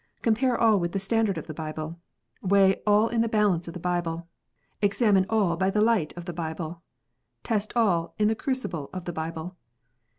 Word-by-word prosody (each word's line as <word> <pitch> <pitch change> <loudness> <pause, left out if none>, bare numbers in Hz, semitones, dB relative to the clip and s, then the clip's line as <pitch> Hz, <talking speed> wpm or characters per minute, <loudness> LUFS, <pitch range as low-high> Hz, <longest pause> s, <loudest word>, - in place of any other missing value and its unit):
Compare 240 +2 +2
all 220 -3 +5
with 170 -1 -2
the - - 0
standard 205 -1 +1
of 160 - -5
the 155 - -7
Bible. 155 +1 -6 0.4
Weigh 195 0 +4
all 210 +2 +5
in 235 -1 +1
the 230 - +1
balances 205 -6 +2
of 170 - -7
the - - -5
Bible. 170 -1 -2 0.5
Examine 200 -2 +3
all 205 -6 +2
by 190 +3 +1
the 210 - 0
light 215 -7 +2
of 175 - -7
the 175 - -5
Bible. 165 0 -5 0.6
Test 215 -2 -1
all 180 -8 +1
in 210 - +3
the 220 - +3
crucible 220 - -3
of 185 -1 -6
the 175 - -4
Bible. 165 +3 -5
190 Hz, 190 wpm, -26 LUFS, 170-215 Hz, 0.6 s, all